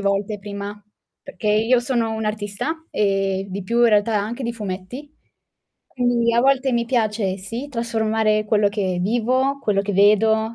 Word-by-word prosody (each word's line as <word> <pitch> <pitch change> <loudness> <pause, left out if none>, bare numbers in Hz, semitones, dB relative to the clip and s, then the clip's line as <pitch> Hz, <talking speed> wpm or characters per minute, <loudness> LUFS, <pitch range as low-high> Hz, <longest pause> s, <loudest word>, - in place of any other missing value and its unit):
volte 200 +1 -1
prima, 205 +1 -7 0.4
perché 275 -5 -8
io 225 +4 +3
sono 240 -2 -1
un'artista, 215 +8 -3
e 195 -1 0
di 195 +1 -5
più 235 +5 0
in 235 - +6
realtà 210 +1 +2
anche 225 +6 -4
di 235 -1 -3
fumetti, 215 +8 -7 0.7
quindi 245 -2 +1
a 235 - +4
volte 265 0 +2
mi 235 -1 0
piace 215 -5 0
sì 230 +9 -6
trasformare 220 -3 0
quello 210 -1 +3
che 190 -4 -2
vivo, 255 +6 +1
quello 200 -5 +1
che 205 0 -3
vedo, 220 +3 +3
220 Hz, 155 wpm, -21 LUFS, 200-235 Hz, 0.7 s, in